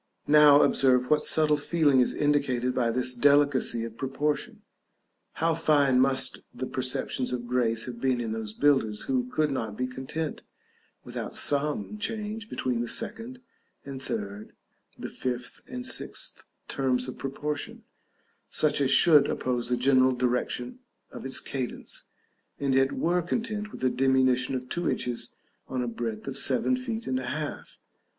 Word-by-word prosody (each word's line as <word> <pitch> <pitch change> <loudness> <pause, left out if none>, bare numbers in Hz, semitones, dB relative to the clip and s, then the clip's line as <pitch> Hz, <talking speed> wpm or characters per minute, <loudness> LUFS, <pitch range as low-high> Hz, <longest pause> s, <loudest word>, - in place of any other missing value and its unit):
Now 150 -1 +7
observe 125 -1 +3
what 150 0 +4
subtle 150 -1 +3
feeling 145 -2 +2
is 125 - +2
indicated 135 -4 +1
by 120 -2 +1
this 125 +2 +1
delicacy 140 -3 +3
of 115 0 -7
proportion. 145 +2 -2 0.7
How 165 +1 +1
fine 145 -5 +3
must 130 0 +1
the 130 - -5
perceptions 130 0 -2
of 120 -1 -3
grace 120 -2 0
have 120 -2 -8
been 130 -2 +1
in 115 -2 -3
those 110 -1 -4
builders 120 -4 +1
who 255 -2 -1
could 155 - 0
not 110 -6 -3
be 125 - 0
content 135 +5 -5 0.6
without - - -5
some 150 +9 +1
change 220 +1 -3
between 125 -2 -1
the 120 - -3
second 240 - -2 0.4
and 135 -1 -7
third, 105 -5 -4 0.4
the - - -7
fifth 125 -1 -4
and 250 0 -6
sixth - - -2 0.2
terms 130 -2 0
of 130 - -8
proportion, 145 +2 -4 0.7
such 150 -2 +1
as 135 - +2
should 150 +1 +6
oppose 125 -1 -1
the 125 - +1
general 130 0 +4
direction 125 - -2 0.3
of - - -9
its 135 - 0
cadence, 130 -3 -4 0.5
and 140 -1 0
yet 135 +1 +3
were 175 +2 +1
content 215 +3 -3
with - - -9
a 130 - +4
diminution 130 0 +2
of 125 0 -4
two 175 +6 -2
inches 120 -1 -3 0.3
on 130 -1 -2
a - - -3
breadth 115 -1 -5
of 135 0 -1
seven 140 - +2
feet 235 -3 -4
and 130 0 -1
a 130 - -6
half! 150 0 -5
130 Hz, 155 wpm, -27 LUFS, 125-150 Hz, 0.7 s, Now